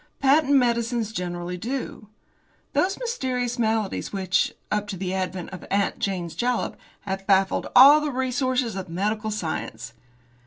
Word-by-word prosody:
Patent 285 +1 +4
medicines 235 -3 +1
generally 175 -1 -4
do. 235 0 -5 0.7
Those 385 +2 +1
mysterious 255 - -2
maladies 220 -3 0
which, 190 -1 +1 0.2
up 210 -1 0
to 195 - -5
the 185 0 -3
advent 185 -2 -3
of 185 - -8
'Aunt 200 0 0
Jane's 180 -4 -2
Jalap,' 245 0 -1 0.3
have 195 -1 -5
baffled 195 -1 +2
all 285 +4 +9
the 300 - -1
resources 255 -3 -1
of 190 -2 -5
medical 210 +5 -1
science. 140 - -4
215 Hz, 140 wpm, -24 LUFS, 190-250 Hz, 0.7 s, all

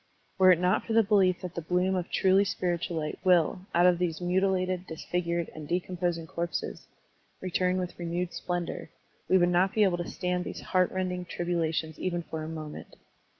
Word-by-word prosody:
Were 185 0 +8
it 180 - +5
not 180 +1 +2
for 225 - -3
the 225 0 +6
belief 195 -3 +3
that 180 -2 -6
the 170 - -4
bloom 180 +3 +1
of 180 -2 -2
truly 190 +1 +4
spiritual 175 -3 -2
light 150 -1 -3
will, 180 +1 +3
out 175 +1 +5
of 180 -1 +4
these 170 -3 -1
muti 185 +2 +2
lated, 185 -1 -1
disfigured, 170 +1 -2
and 155 -1 -8
decomposing 175 -1 -1
corpses, 170 +1 -4 0.5
return 185 0 0
with 180 -1 -4
renewed 175 +1 -2
splendor, 175 -1 -3 0.4
we 190 - +6
would 175 -1 +4
not 180 +2 +2
be 215 - +5
able 180 -3 +2
to 175 - -4
stand 180 -1 -2
these - - -6
heart 185 -1 +1
rending 180 -1 -2
tribulations 165 -3 -2
even 175 -2 -2
for 160 -1 -5
a 155 - -5
moment. 155 -2 -8
180 Hz, 190 wpm, -28 LUFS, 170-185 Hz, 0.5 s, Were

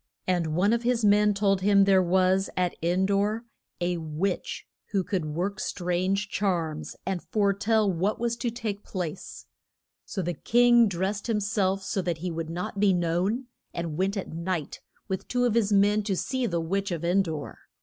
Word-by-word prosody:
And 170 -4 0
one 200 +6 +3
of 235 - +1
his 240 -2 +1
men 210 0 +4
told 195 -1 +2
him 200 0 +5
there 195 -1 +5
was 185 +2 +2
at 180 -1 +1
En 175 +3 +2
dor 205 +4 0 0.3
a 175 0 0
witch 165 +4 -3 0.3
who 195 -2 +2
could 180 -3 -2
work 180 +6 -3
strange 185 +3 -1
charms, 175 -7 -2
and 185 -2 -2
fore 200 -2 +1
tell 210 0 +2
what 190 +5 0
was 235 0 0
to 240 - -1
take 220 -3 -4
place. 180 -2 -6 0.6
So 190 - -4
the 175 +1 -1
king 240 +6 +4
drest 195 +4 -2
him 220 -2 +2
self 195 -2 0
so 190 0 -1
that 175 -3 -2
he 175 +2 -4
would 165 -1 -4
not 180 +4 -4
be 200 -2 +4
known, 180 +8 0 0.3
and 170 -3 -3
went 195 +4 0
at 190 - -5
night 170 -2 -3 0.3
with 190 -2 -4
two 245 0 +1
of 240 - +2
his 220 -3 +2
men 205 +1 +4
to 195 -3 0
see 260 +3 -1
the 170 -4 -1
witch 195 +5 -1
of 170 -3 -3
En 180 +3 +3
dor. 160 -5 -5
195 Hz, 190 wpm, -27 LUFS, 175-210 Hz, 0.6 s, him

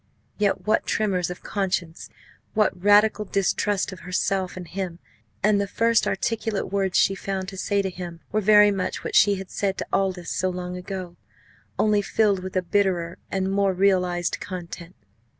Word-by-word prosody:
Yet 205 -2 +1
what 215 +1 +1
tremors 190 -5 0
of 180 - -8
conscience 185 -4 -3 0.5
what 210 -4 +1
radical 210 +1 +5
distrust 200 0 0
of 190 - -9
herself 185 +1 -1
and 180 -2 -7
him! 180 -1 -4 0.5
And 205 0 +4
the 200 - -2
first 230 +3 +2
articulate 225 -4 -2
words 195 -2 +1
she 195 - +4
found 190 -1 -4
to 195 - -9
say 200 +1 0
to 190 - -1
him 175 -2 -8
were 215 - +1
very 210 0 +6
much 195 -2 -3
what - - -5
she 205 -1 +6
had 190 -1 -8
said 195 -1 -1
to - - -3
Aldous 185 -3 0
so 185 - 0
long 180 0 -5
ago 180 -1 -6 0.6
only 210 -1 +3
filled 200 -2 +1
with 185 +1 -7
a 185 - +1
bitterer 180 -3 0
and 190 0 -1
more 195 -1 +2
realised 180 -2 +1
content. 180 -1 -7
190 Hz, 170 wpm, -24 LUFS, 180-205 Hz, 0.6 s, very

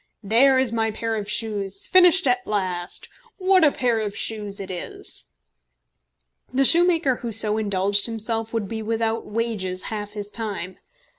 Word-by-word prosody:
"There 250 +6 +5
is 260 -3 +2
my 225 -1 +1
pair 225 +1 -3
of 210 -1 -4
shoes 200 -3 -1
finished 370 0 +5
at 250 -1 +1
last! 185 -4 -3 0.3
What 375 -2 +3
a 300 - +6
pair 240 -4 0
of 205 -2 -4
shoes 210 -2 -3
it 195 -1 -6
is!" 180 - -4 1.2
The 270 +2 +2
shoemaker 335 -5 +4
who 235 - -5
so 215 0 +2
indulged 200 0 +1
himself 225 0 -2
would 225 -3 -2
be 220 +2 -5
without 225 +1 -2
wages 210 -5 -3
half 210 -1 -5
his 205 -1 -6
time. 205 -5 -5
220 Hz, 155 wpm, -23 LUFS, 205-245 Hz, 1.2 s, a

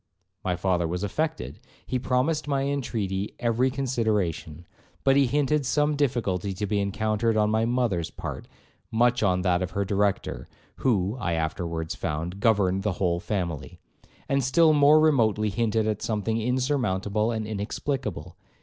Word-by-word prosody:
My 90 -1 0
father 90 -1 0
was 90 +3 -3
affected; 100 - -3 0.3
he 130 - -1
promised 130 +5 0
my 140 -2 0
intreaty 110 -8 -2
every 120 +2 +2
consideration; 110 - -1 0.4
but 135 0 +4
he 140 -1 +4
hinted 145 +3 +1
some 150 +3 +1
difficulty 110 -9 0
to 105 +3 -3
be 100 0 0
encountered 110 +3 0
on 105 0 +2
my 110 +1 +2
mother's 115 -9 0
part, - - -7 0.4
much 120 +1 +2
on 90 -3 +2
that 90 -2 +2
of 90 +1 -4
her 100 - +1
Director, 100 0 -1 0.3
who 105 -5 +1
(I 90 -6 -1
afterwards 80 0 -2
found) 85 +2 -4
governed 100 -4 +2
the 105 -1 -1
whole 90 -2 0
family, 85 -9 -4 0.5
and 140 -1 +1
still 155 +5 +4
more 150 +1 +6
remotely 110 -9 +3
hinted 110 +1 0
at 105 -1 -1
something 110 +1 -1
insurmountable 115 -5 0
and 110 -2 -2
inexplicable. 105 - -4
110 Hz, 150 wpm, -26 LUFS, 95-125 Hz, 0.5 s, more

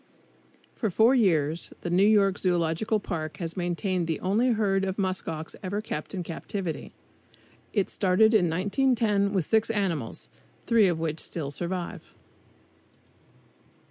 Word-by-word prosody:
For 220 - -2
four 220 +7 +4
years 165 - +1
the 175 - -4
New 190 +3 +4
York 200 -2 +3
Zoological 175 +4 +1
Park 160 -5 -5
has 165 -2 -5
maintained 175 0 -1
the 160 - -1
only 215 +7 +2
herd 195 -3 +1
of 190 0 -2
musk 185 -2 -2
ox 160 0 -5
ever 195 +2 -2
kept 200 -4 -5
in 180 - -3
captivity. 170 +1 -5 0.8
It 200 -4 +1
started 205 +3 +3
in 180 -6 +4
1910 205 - +1
with 190 -6 0
six 220 0 +2
animals, 165 - -2 0.4
three 225 -4 +4
of 170 -3 0
which 160 -1 -2
still 145 -5 -4
survive. 175 +3 -4
185 Hz, 140 wpm, -27 LUFS, 165-210 Hz, 0.8 s, four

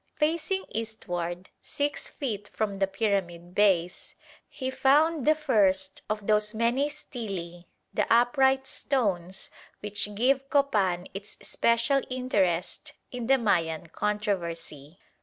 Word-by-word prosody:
Facing 330 +5 0
eastward, 180 -5 -4
6 290 +1 -2
feet 210 -7 -4
from 200 -3 -3
the 195 - +3
pyramid 190 -4 -2
base, 180 -4 +1 0.3
he 260 -1 -4
found 290 +3 +3
the 310 - +6
first 195 -10 +2
of 210 -1 -2
those 210 0 +2
many 240 +6 +2
stelae, 195 - -6 0.3
the - - 0
upright 265 +3 +4
stones 190 -11 -2 0.3
which 205 0 -1
give 270 +4 +2
Copan 200 - +2
its 200 +2 -8
special 235 +4 +2
interest 200 -9 -1 0.2
in 245 -2 -4
the 270 +1 +5
Mayan 170 -8 0
controversy. 170 -7 -3
210 Hz, 115 wpm, -28 LUFS, 185-265 Hz, 0.3 s, the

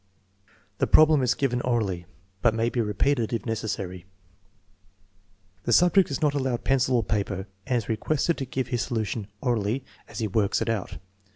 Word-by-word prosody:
The - - +2
problem 155 -2 +6
is 125 -1 +2
given 125 -3 0
orally, 100 -9 -1 0.3
but 115 -2 +3
may 115 +1 +1
be 120 - 0
repeated 115 +3 0
if 115 - -2
necessary. 100 -5 -4 1.6
The - - 0
subject 180 - +5
is 140 +3 -3
not 150 -1 +3
allowed 130 -4 -1
pencil 130 -1 +2
or 120 - +2
paper 100 -2 -2 0.2
and 125 - +2
is 115 - -3
requested 155 +9 0
to 135 - -2
give 130 0 -3
his 120 -3 0
solution 110 -3 -2
orally 120 +1 0 0.2
as - - -11
he 110 - -1
works 100 0 +1
it - - -1
out. 110 -5 -2
120 Hz, 170 wpm, -26 LUFS, 105-135 Hz, 1.6 s, problem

